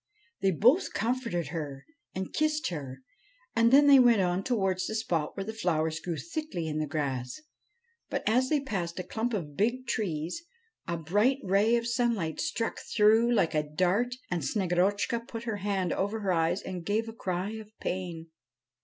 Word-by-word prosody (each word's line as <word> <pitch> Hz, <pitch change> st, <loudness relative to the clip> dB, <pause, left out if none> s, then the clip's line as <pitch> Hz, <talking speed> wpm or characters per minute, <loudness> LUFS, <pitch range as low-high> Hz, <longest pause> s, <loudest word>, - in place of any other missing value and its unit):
They 195 Hz, -, +3 dB
both 245 Hz, -, +3 dB
comforted 230 Hz, -, -1 dB
her 145 Hz, -4 st, -5 dB, 0.3 s
and 190 Hz, 0 st, -4 dB
kissed 310 Hz, 0 st, +1 dB
her, 135 Hz, -6 st, -6 dB, 0.5 s
and 230 Hz, 0 st, +4 dB
then 285 Hz, +2 st, +7 dB
they 280 Hz, -1 st, +8 dB
went 240 Hz, -4 st, +6 dB
on 180 Hz, +1 st, 0 dB
towards 195 Hz, -6 st, 0 dB
the 220 Hz, -, -3 dB
spot 170 Hz, -9 st, -1 dB
where 195 Hz, -, -2 dB
the 220 Hz, +3 st, -5 dB
flowers 160 Hz, -6 st, 0 dB
grew 170 Hz, -1 st, -4 dB
thickly 310 Hz, -, -4 dB
in 155 Hz, 0 st, -2 dB
the 155 Hz, -, -1 dB
grass. 135 Hz, -, -3 dB, 0.7 s
But, -, -, -3 dB
as 250 Hz, +4 st, +3 dB
they 300 Hz, -2 st, +2 dB
passed 180 Hz, -11 st, -3 dB
a 185 Hz, -, -3 dB
clump 225 Hz, +6 st, -2 dB
of 150 Hz, -7 st, -5 dB
big 240 Hz, -, 0 dB
trees, 175 Hz, -, -2 dB, 0.5 s
a 170 Hz, -1 st, -1 dB
bright 205 Hz, -, +2 dB
ray 200 Hz, +5 st, +3 dB
of 235 Hz, 0 st, 0 dB
sunlight 235 Hz, -9 st, 0 dB
struck 235 Hz, -8 st, -2 dB
through 220 Hz, +2 st, +3 dB
like 200 Hz, -9 st, +2 dB
a 155 Hz, -, +2 dB
dart 185 Hz, +11 st, 0 dB, 0.2 s
and 175 Hz, -1 st, 0 dB
Snegorotchka 200 Hz, -, 0 dB
put 230 Hz, -3 st, -6 dB
her 225 Hz, -3 st, -2 dB
hand 195 Hz, -3 st, -1 dB
over 205 Hz, +3 st, -1 dB
her 190 Hz, -2 st, +1 dB
eyes 170 Hz, +3 st, +1 dB
and 180 Hz, -2 st, -5 dB
gave 215 Hz, +5 st, 0 dB
a 225 Hz, -, -6 dB
cry 185 Hz, -2 st, -3 dB
of 220 Hz, -1 st, -8 dB
pain. 170 Hz, -3 st, -4 dB
195 Hz, 180 wpm, -29 LUFS, 170-230 Hz, 0.7 s, they